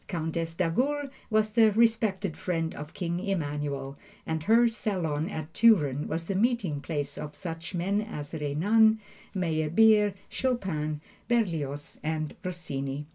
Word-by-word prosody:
Countess 165 -1 -2
d'Agoult 265 - 0 0.2
was 215 -1 +2
the 220 -1 +5
respected 220 -5 +2
friend 165 -3 -2
of 150 +1 -8
King 170 -1 -2
Emmanuel, 145 -7 -3 0.3
and 160 -1 -2
her 235 +2 +6
salon 175 -8 -1
at 160 -4 -6
Turin 150 - +4
was 165 +1 -3
the 195 - -2
meeting 195 - +1
place 145 -3 -3
of 150 0 -6
such 165 +1 -6
men 195 +4 +1
as 150 -10 -7
Renan, 205 +10 +3 0.4
Meyerbeer, 190 +5 +3
Chopin, 160 - -2 0.3
Berlioz 160 - -1
and 155 -1 -2
Rossini. 145 -6 -4
170 Hz, 130 wpm, -28 LUFS, 150-215 Hz, 0.4 s, her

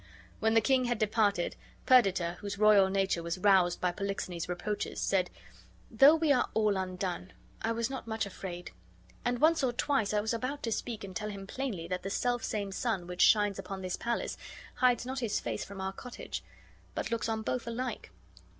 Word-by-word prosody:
When 220 +1 +2
the 225 - +6
king 260 +2 +3
had 240 -1 0
departed, 210 -4 +1 0.3
Perdita, 190 -9 +4
whose 200 -1 -5
royal 205 -2 +6
nature 195 -3 +1
was 170 +2 -3
roused 185 -3 +4
by 180 - +1
Polixenes's 185 -3 -4
reproaches, 205 +4 -3
said, 185 -2 +1 0.6
"Though 270 +7 +7
we 320 -2 +2
are 255 - +3
all 215 -2 +3
undone, 185 -1 -3 0.3
I 225 - 0
was 230 0 0
not 265 -3 -6
much 220 -1 -1
afraid; 180 -2 -7 0.5
and 245 0 0
once 315 +3 +4
or 255 - +2
twice 240 -3 +1
I 210 - +2
was 220 +2 -1
about 255 +5 -3
to 230 - -1
speak 225 -1 -3
and 190 -2 -8
tell 210 +5 -3
him 200 -2 -7
plainly 200 -7 -4
that 180 +1 -2
the 195 - -4
selfsame 215 -3 -1
sun 195 -3 -1
which 180 0 -4
shines 205 -2 +5
upon 195 -1 -6
his 185 -1 -2
palace 235 0 -2 0.4
hides 250 -2 +2
not 260 +1 -3
his 230 -4 0
face - - -3
from 200 -1 -9
our 190 0 -3
cottage, 245 +4 -7 0.5
but - - -3
looks 230 0 -1
on 220 0 -1
both 245 +1 -2
alike." 235 0 -4
210 Hz, 190 wpm, -31 LUFS, 190-240 Hz, 0.6 s, Though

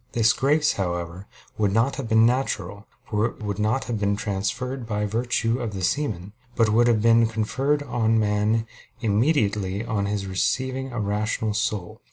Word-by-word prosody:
This 115 -1 +4
grace, 150 +3 +2
however, 90 0 -4 0.3
would 105 -2 +2
not 120 +6 +1
have 130 -5 -4
been 110 0 +5
natural, 110 -5 -1 0.2
for 110 0 +1
it 115 - -10
would 100 -1 -3
not 110 +5 +1
have 115 -3 -3
been 100 0 +1
transfused 110 +6 -3
by 105 -1 -1
virtue 115 +2 0
of 115 -5 -4
the 95 - -4
semen; 105 -6 -1 0.2
but 115 -2 +3
would 120 +3 +4
have 110 -3 +2
been 115 0 +5
conferred 135 +7 0
on 115 -5 +1
man 105 +1 +1 0.4
immediately 105 -4 +1
on 105 -4 -1
his 100 -1 -2
receiving 130 +7 -1
a 120 - -4
rational 105 +1 -1
soul. 105 -4 -2
110 Hz, 170 wpm, -24 LUFS, 100-120 Hz, 0.4 s, been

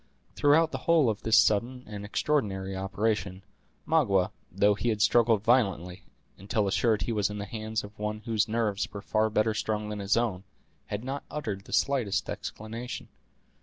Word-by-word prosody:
Throughout 155 +3 +4
the 130 - -4
whole 155 -8 +5
of 105 - -7
this 110 0 +4
sudden 120 +5 +2
and 105 -1 -7
extraordinary 100 -5 -1
operation, 95 0 -2 0.4
Magua, 100 - +2 0.2
though 100 +3 +3
he 120 +4 -1
had 110 -2 0
struggled 115 -1 +4
violently, 100 -7 +1 0.4
until 100 +2 0
assured 105 0 +2
he 115 - -2
was 105 -3 +1
in 105 - -5
the 100 - -4
hands 110 +1 -4
of 105 +1 -12
one 105 0 -3
whose 110 -1 0
nerves 110 -2 -1
were 100 -1 -7
far 110 0 +1
better 110 +1 +1
strung 105 -1 -2
than 105 -1 -4
his 100 +3 +1
own, 105 -6 0 0.4
had 105 +2 -4
not 135 +2 -4
uttered 105 -10 -4
the - - -13
slightest 130 -8 +1
exclamation. 115 +3 -6
110 Hz, 170 wpm, -28 LUFS, 100-115 Hz, 0.4 s, whole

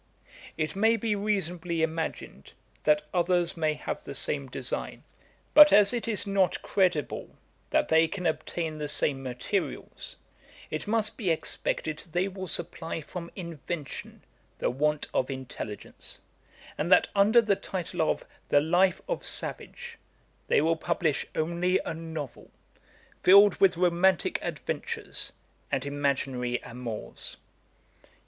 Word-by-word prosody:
'It 155 +2 -1
may 225 +3 +4
be 220 -1 0
reasonably 180 -5 -1
imagined, 160 - -4 0.3
that 150 0 +4
others 175 0 +2
may 155 -2 +1
have - - -5
the 140 - -7
same 140 0 0
design; 125 0 -4 0.5
but 300 0 +10
as 205 +2 +6
it 235 -1 -2
is 215 -3 -1
not 195 -2 +2
credible 180 -7 0 0.3
that - - +2
they 160 0 +5
can 180 +2 -5
obtain 160 -1 -2
the 150 - -2
same 145 -2 0
materials, 130 +10 -4 0.6
it - - -3
must 215 0 0
be 200 -6 0
expected 155 -1 -1
they 175 +3 -1
will 190 -1 -6
supply 165 0 -3
from 170 +2 -7
invention 170 -4 -6 0.3
the - - 0
want 150 +3 0
of 130 - +1
intelligence; 130 -5 -7 0.6
and 170 +5 -1
that - - +7
under 205 +4 +6
the 215 -3 +3
title 180 -4 -4
of 160 - 0 0.2
"The 145 - +6
Life 175 +4 +2
of - - -2
Savage," - - -4 0.5
they - - +4
will 165 +1 +2
publish 160 -2 0
only 175 +3 +1
a - - -2
novel, 160 -4 -7 0.7
filled 200 +2 +8
with 185 -3 +4
romantick 180 +1 +3
adventures, - - -3 0.4
and 135 - 0
imaginary 135 -3 -1
amours. 115 -2 -7
165 Hz, 130 wpm, -28 LUFS, 150-190 Hz, 0.7 s, but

